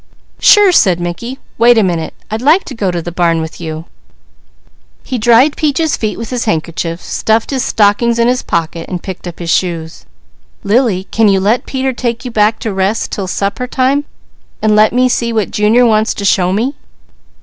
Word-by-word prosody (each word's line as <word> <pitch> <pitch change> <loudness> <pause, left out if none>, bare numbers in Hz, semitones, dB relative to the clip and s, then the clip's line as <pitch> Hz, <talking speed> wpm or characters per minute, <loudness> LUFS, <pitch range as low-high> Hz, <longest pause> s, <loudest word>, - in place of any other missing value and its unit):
"Sure!" 410 -2 +6
said 185 - +3
Mickey. 175 +9 -5 0.2
"Wait 240 +1 +5
a 220 - +4
minute! 170 -4 -2 0.2
I'd 220 +1 -3
like 310 +9 +4
to - - -9
go 205 -6 -2
to 175 -2 -3
the 175 - -5
barn 170 -1 +1
with 160 +1 -7
you." 160 0 -6 1.2
He 250 - -4
dried 240 +6 +4
Peaches' 310 +1 0
feet 215 -2 -3
with 230 +1 -7
his 245 -2 -2
handkerchief, 165 -2 -2
stuffed 220 +3 -1
his 265 -2 -1
stockings 225 +3 +2
in 235 0 +2
his 250 +1 +1
pocket, 165 0 -3
and 180 -2 -5
picked 185 -1 -7
up 175 - -8
his 170 -2 -3
shoes. 165 -3 -2 0.6
"Lily, 210 -3 +1
can 225 -1 +3
you 195 -1 +3
let 210 +6 0
Peter 265 0 -2
take 240 0 -3
you 250 - -5
back 215 0 +2
to 220 - -3
rest 195 +4 -1
'til 195 -2 -4
supper 200 +7 -2
time, 270 +3 0 0.6
so 215 -1 +3
I 215 0 +5
can 255 +2 +2
see 235 -2 -1
what 220 -3 -1
Junior 220 +4 +3
wants 220 -1 +2
to 200 - -4
show 185 -2 +2
me?" 230 +8 -1
215 Hz, 195 wpm, -13 LUFS, 180-245 Hz, 1.2 s, Sure